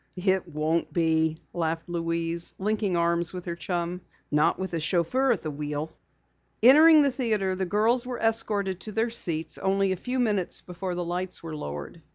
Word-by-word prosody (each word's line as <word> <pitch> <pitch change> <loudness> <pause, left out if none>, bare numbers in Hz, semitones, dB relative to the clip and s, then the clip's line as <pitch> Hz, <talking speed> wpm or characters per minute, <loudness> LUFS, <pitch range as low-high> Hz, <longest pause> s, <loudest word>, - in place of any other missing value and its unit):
"It 190 0 0
won't 160 +1 -1
be," 160 -1 +1 0.2
laughed 165 -1 -2
Louise, 170 0 0
linking 205 -2 -1
arms 170 0 +1
with 180 -1 -7
her 170 -1 -4
chum. 175 0 -3 0.3
"Not 150 0 +2
with 190 -1 -5
a 165 - -1
chauffeur 185 - +1
at 205 -8 -1
the 155 - -3
wheel." 150 +1 -5 0.7
Entering 305 +5 +8
the 280 - +2
theatre, 215 -7 -1
the 190 0 -2
girls 225 +6 +2
were 250 -1 -4
escorted 205 -5 +1
to 215 - -6
their 225 +2 0
seats 160 -8 +1
only 195 0 +1
a - - 0
few 250 +8 -4
minutes 210 -7 0
before 180 0 -5
the 175 0 -3
lights 180 +1 -3
were 160 -2 -6
lowered. 75 - -7
180 Hz, 180 wpm, -26 LUFS, 165-210 Hz, 0.7 s, Entering